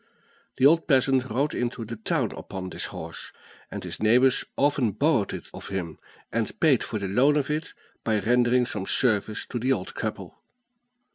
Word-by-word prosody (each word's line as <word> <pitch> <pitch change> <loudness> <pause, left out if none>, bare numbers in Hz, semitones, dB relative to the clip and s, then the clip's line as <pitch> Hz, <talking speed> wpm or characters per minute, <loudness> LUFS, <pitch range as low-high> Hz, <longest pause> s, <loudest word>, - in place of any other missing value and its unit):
The 130 - +3
old 165 +3 +5
peasant 130 -2 +3
rode 140 +6 0
into 120 -1 -3
the 115 +2 -6
town 110 - -1
upon 95 -1 -7
this - - -3
horse, - - -8 0.4
and - - -6
his - - -5
neighbors 125 +5 +4
often 140 -6 +2
borrowed 135 - +2
it - - -6
of - - -8
him, 90 -5 -4 0.3
and 115 -1 -2
paid 145 -7 +4
for 110 - -3
the 100 -2 -3
loan 130 +10 +3
of 145 0 -1
it 155 +2 -3 0.3
by 110 -2 +1
rendering 120 +3 +3
some 105 -5 -5
service 110 -3 +1
to 120 - -4
the 130 +3 0
old 95 -8 -2
couple. - - -5
120 Hz, 180 wpm, -26 LUFS, 110-135 Hz, 0.4 s, old